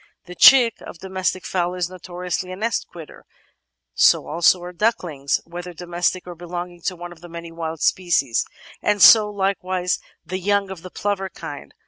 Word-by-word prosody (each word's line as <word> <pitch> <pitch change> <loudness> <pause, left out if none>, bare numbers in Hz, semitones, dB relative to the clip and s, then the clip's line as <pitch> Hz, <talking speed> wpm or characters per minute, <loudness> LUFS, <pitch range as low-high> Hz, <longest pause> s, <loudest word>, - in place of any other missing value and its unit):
The 180 - -9
chick 240 +3 +6
of - - -10
the 190 +3 -10
domestic 185 -1 -2
fowl 180 -1 -1
is 180 -2 -1
notoriously 180 0 -5
a - - -5
nest 220 +3 -2
quitter; 165 -3 -12 0.7
so - - +4
also 170 +3 +3
are 180 0 -8
ducklings, 170 -8 0
whether 175 +1 -8
domestic 175 +2 -2
or 180 - -7
belonging 175 +1 -7
to 185 - -1
one 175 0 -9
of 170 -2 -14
the 175 - -11
many 170 0 -8
wild 165 -1 -5
species, 155 -10 +1 0.4
and 210 0 +1
so 210 +2 +8
likewise 185 -2 -1 0.3
the 185 +4 -4
young 200 +1 0
of 185 -4 -8
the 185 - -9
plover 195 0 -2
kind. - - -9
180 Hz, 175 wpm, -22 LUFS, 175-190 Hz, 0.7 s, so